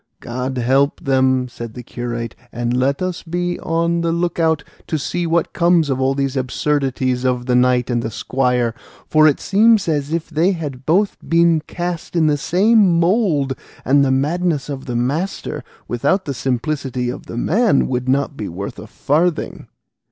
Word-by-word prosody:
"God 130 +2 -4
help 135 +4 +2
them," 130 -1 +2
said 115 -2 -8
the 125 - -7
curate; 120 -1 -5 0.2
"and 120 +1 -2
let 135 +6 +1
us 185 -2 -3
be 175 +1 -3
on 170 +1 0
the 170 0 0
look 170 +1 -1
out 160 -2 +2 0.2
to 160 - -1
see 170 +4 -2
what 165 +1 0
comes 170 -4 +3
of 130 0 -1
all 135 +1 +2
these 135 -1 -1
absurdities 130 -1 -1
of 125 -1 0
the 125 - 0
knight 125 0 +2
and 120 -1 -1
squire, 125 0 0 0.3
for 155 0 +5
it 145 - +2
seems 215 0 +3
as 150 -2 -1
if 165 -1 -2
they 170 +4 +1
had 140 -6 -6
both 195 +6 +2
been 170 -1 +4
cast 175 0 -4
in 165 -2 +3
the 150 -1 +3
same 190 +3 +3
mould, 170 - +2 0.3
and 140 +2 +4
the 135 - +2
madness 150 +2 0
of 140 -1 -5
the 120 - -3
master 145 +11 -2 0.2
without 185 - 0
the 140 - -3
simplicity 125 0 -2
of - - -9
the - - -6
man 205 - +2
would 125 0 -2
not 140 +1 +1
be 105 - -5
worth 95 +4 -6
a - - -9
farthing." 160 +3 -1
140 Hz, 175 wpm, -19 LUFS, 125-170 Hz, 0.3 s, for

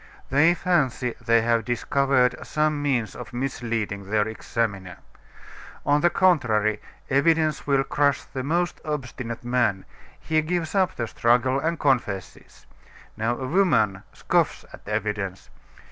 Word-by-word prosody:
They 155 +6 +5
fancy 140 -9 0
they 115 0 +4
have 115 0 +2
discovered 125 +1 +1
some 150 -1 0
means 125 -7 -1
of 125 - -9
misleading 115 -6 -3
their 105 0 +1
examiner. 100 -5 -3 0.9
On 145 +1 +3
the 175 - +4
contrary, 110 - +2 0.3
evidence 155 +2 +2
will 140 -1 +3
crush 140 0 +1
the 130 - -6
most 170 +5 -1
obstinate 125 -5 -5
man; 120 -6 0 0.3
he 155 -1 +1
gives 165 0 -2
up 190 -2 +1
the 115 - -2
struggle, 120 +4 +2
and 165 +3 -1
confesses. 110 -10 -2 0.5
Now, 115 +2 -1
a 130 - -4
woman 120 - +2
scoffs - - 0
at - - -13
evidence. 105 -3 -3
125 Hz, 130 wpm, -24 LUFS, 110-150 Hz, 0.9 s, They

